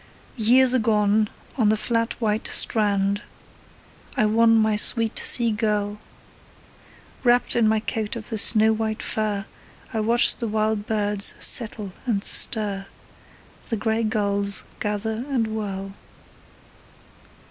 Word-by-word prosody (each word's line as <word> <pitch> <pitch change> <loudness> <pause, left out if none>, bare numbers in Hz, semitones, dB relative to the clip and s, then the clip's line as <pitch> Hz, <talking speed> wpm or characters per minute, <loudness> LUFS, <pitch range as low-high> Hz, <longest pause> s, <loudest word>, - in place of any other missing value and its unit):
Years 250 +3 +4
agone, 215 -2 +1 0.3
on 220 -5 +2
the 215 - +1
flat 230 +1 -3
white 215 -2 -2
strand, 200 -2 +2 1.0
I 215 - +2
won 225 +1 +3
my 220 -1 +1
sweet 225 +1 +1
sea 235 -2 +3
girl: 210 -1 -2 1.2
Wrapped 245 0 +2
in 230 -2 +2
my 220 0 +1
coat 220 -1 -4
of 220 -2 -9
the 220 -2 -3
snow 220 +1 +3
white 220 0 -4
fur, 210 -2 -3 0.5
I 220 - -2
watched 230 +3 +2
the 235 - -4
wild 215 -1 -2
birds 205 -2 +2
settle 215 -4 +3 0.2
and 205 -4 -1
stir, 200 -5 +2 0.8
The 225 - -2
grey 220 +2 -2
gulls 200 -2 +1 0.2
gather 215 +2 -4
and 250 -5 -1
whirl. 200 -3 -6
215 Hz, 125 wpm, -22 LUFS, 210-225 Hz, 1.2 s, Years